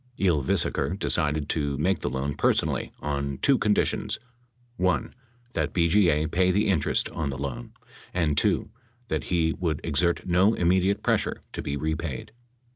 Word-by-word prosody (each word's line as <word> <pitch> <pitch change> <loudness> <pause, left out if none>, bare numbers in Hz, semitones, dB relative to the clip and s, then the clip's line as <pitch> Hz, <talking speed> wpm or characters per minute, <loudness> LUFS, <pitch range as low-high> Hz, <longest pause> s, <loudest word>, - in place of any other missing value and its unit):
Ylvisaker 85 +1 +1
decided 75 -6 +1
to 70 -3 -1
make 90 +4 +1
the - - -2
loan 70 +2 -2
personally - - 0
on 70 -2 -2
two 135 - +3
conditions: 105 -2 +1 0.6
(1) 90 -7 0 0.4
That - - -1
BGA 85 -3 +3
pay 90 +1 +3
the 105 +3 +2
interest 85 -7 +1
on 75 -3 -3
the 70 - -4
loan; 70 -3 -5 0.4
and 80 -5 +1
(2) 105 - +1 0.4
that - - -2
he 80 -2 +1
would 80 -5 -2
exert 85 +2 +1
no 95 +5 +3
immediate 95 +3 +2
pressure - - +1
to - - -4
be 70 - -3
repaid. 80 +2 -3
80 Hz, 145 wpm, -26 LUFS, 70-90 Hz, 0.6 s, two